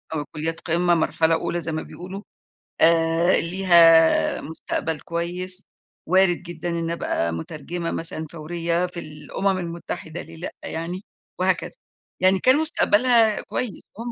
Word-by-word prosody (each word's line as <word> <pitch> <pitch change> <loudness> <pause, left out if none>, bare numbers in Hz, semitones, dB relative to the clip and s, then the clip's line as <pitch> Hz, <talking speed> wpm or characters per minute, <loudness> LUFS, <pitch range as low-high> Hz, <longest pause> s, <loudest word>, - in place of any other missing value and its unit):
أو 150 -1 -2
كليات 160 +2 -3
قمّة 175 +1 +2
مرحلة 160 0 +2
أولى 175 +1 -2
زي 160 0 -4
ما 155 - -2
بيقولوا، 185 +3 -8 0.6
آآ، 165 +1 +4
ليها 170 -2 +5
مستقبل 160 0 -3
كويس 180 +3 -2 0.4
وارد 185 0 +4
جدًا 175 0 -5
إن 170 0 -2
أبقى 85 - -1
مترجمة 165 - -5
مثلًا 160 -1 -4
فوريّة 170 +2 -2
في 175 -1 -7
الأمم 170 +6 -2
المتحدة 170 -2 -6
ليه 165 +1 -12
لأ 175 - -5
يعني، 170 +4 -4 0.4
وهكذا، 185 - 0 0.4
يعني 190 +1 +4
كان 260 +6 +5
مستقبلها 235 -7 +3
كويس 240 -6 -4 0.2
وهُم 235 +2 -5
170 Hz, 130 wpm, -23 LUFS, 165-185 Hz, 0.6 s, ليها